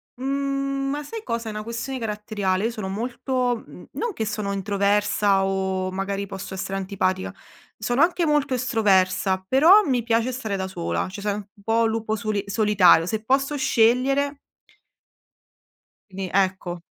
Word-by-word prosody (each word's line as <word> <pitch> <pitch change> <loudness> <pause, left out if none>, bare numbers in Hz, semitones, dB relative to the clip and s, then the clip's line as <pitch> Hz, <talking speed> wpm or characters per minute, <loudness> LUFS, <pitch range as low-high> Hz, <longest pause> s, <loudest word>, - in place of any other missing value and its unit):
mhmm, 275 +1 -2
ma 290 +1 -2
sai 445 +8 -7
cosa, 230 - -3
è - - -4
una 215 0 -5
questione 235 +4 -4
caratteriale. 210 -3 -2
Io 235 - 0
sono 215 -5 -5
molto 245 +3 -2
mhmm, - - -13
non 475 - -2
che 220 - -3
sono 210 -2 -3
introversa 200 0 +1
o, 190 -1 -1
magari, 195 +1 -3
posso 195 0 -7
essere 190 +1 -3
antipatica- 190 -1 -2 0.5
sono 245 +4 +1
anche 340 0 +3
molto 295 -4 +1
estroversa- 195 -6 +2
però 325 - +6
mi 250 -6 +1
piace 235 +2 +1
stare 220 -5 -3
da 190 0 -3
sola, 85 - -2
cioè, 200 +3 -8
sono 205 0 -1
un 205 0 -11
po' 230 +2 +2
lupo 220 -1 -1
soli 210 -2 -2
solitario. 200 -5 +4
Se 215 +4 -3
posso 275 +4 +1
scegliere 270 +3 +2 1.7
quindi 190 0 -5
ecco, 185 -2 0
215 Hz, 150 wpm, -24 LUFS, 195-255 Hz, 1.7 s, però